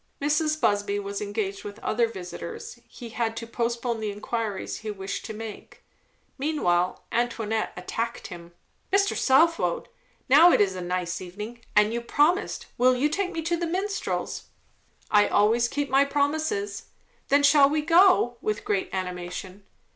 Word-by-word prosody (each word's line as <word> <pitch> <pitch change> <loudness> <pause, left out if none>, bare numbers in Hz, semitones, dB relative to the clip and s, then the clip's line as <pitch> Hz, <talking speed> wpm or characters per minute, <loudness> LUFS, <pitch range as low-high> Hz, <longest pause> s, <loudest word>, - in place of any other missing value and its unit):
Mrs. 305 +2 +1
Busby 205 -3 +1
was 200 0 -4
engaged 205 -1 -3
with 205 0 -8
other 230 +2 +1
visitors; 185 -5 -8
he 240 -3 -10
had 225 0 -2
to 230 - -4
post 235 0 -2
pone 235 -2 -1
the 215 -1 -2
inquiries 210 0 -3
he 215 - -7
wished 195 -1 -5
to 220 - -6
make. 220 -1 -9 0.6
Meanwhile 185 - 0
Antoinette 225 -2 -1
attacked 230 +6 -4
him. 175 -3 -9 0.4
"Mr. 395 +1 +3
Southwode, 330 - +2 0.4
now 315 +7 +8
it - - +4
is 195 -2 +2
a 185 - -5
nice 180 0 -3
evening, 210 +6 -8
and 210 +1 +4
you 235 - -2
promised; 310 - +1
will 255 +1 +5
you 280 +4 +1
take 375 +4 -1
me 330 -2 -4
to 340 +2 0
the 340 0 -2
Minstrels?" 385 +4 -3 0.7
"I 205 0 +5
always 225 +4 +3
keep 285 +3 -2
my 270 +1 +4
promises." 280 -8 -1 0.4
"Then 285 +1 +3
shall 280 -1 +6
we 305 +1 0
go?" 335 -7 +5
with 215 0 -2
great 200 -2 0
animation. 185 +1 -5
230 Hz, 155 wpm, -26 LUFS, 205-290 Hz, 0.7 s, now